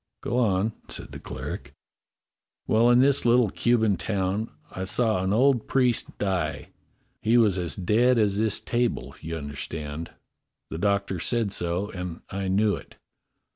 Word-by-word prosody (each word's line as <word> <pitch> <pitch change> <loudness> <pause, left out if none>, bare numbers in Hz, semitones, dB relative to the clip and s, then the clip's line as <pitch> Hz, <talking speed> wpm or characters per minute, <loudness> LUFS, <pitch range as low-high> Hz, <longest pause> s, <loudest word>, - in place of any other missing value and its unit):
"Go 120 - 0
on," 105 -1 +1
said - - -7
the - - -8
cleric. - - -7 0.9
"Well, 115 +2 +4
in 120 +1 +6
this 140 +1 +3
little 120 -3 +4
Cuban 110 -5 +2
town 100 +2 -1 0.2
I 95 - -5
saw 110 -1 +1
an 95 - 0
old 125 +1 +3
priest 125 -3 +1
die. 95 -6 -2 0.5
He 115 +2 +3
was 105 -5 +4
as 85 -5 -2
dead 115 +7 +3
as 105 -2 +2
this 110 -2 +1
table, 115 - -1
you 80 +1 -4
understand; 75 +2 -6 0.6
the 80 - -4
doctor 100 -1 0
said 115 +3 0
so, 90 +3 -2
and 90 -3 -6
I 95 0 -3
knew 100 +2 +2
it. - - -12
100 Hz, 150 wpm, -26 LUFS, 90-115 Hz, 0.9 s, in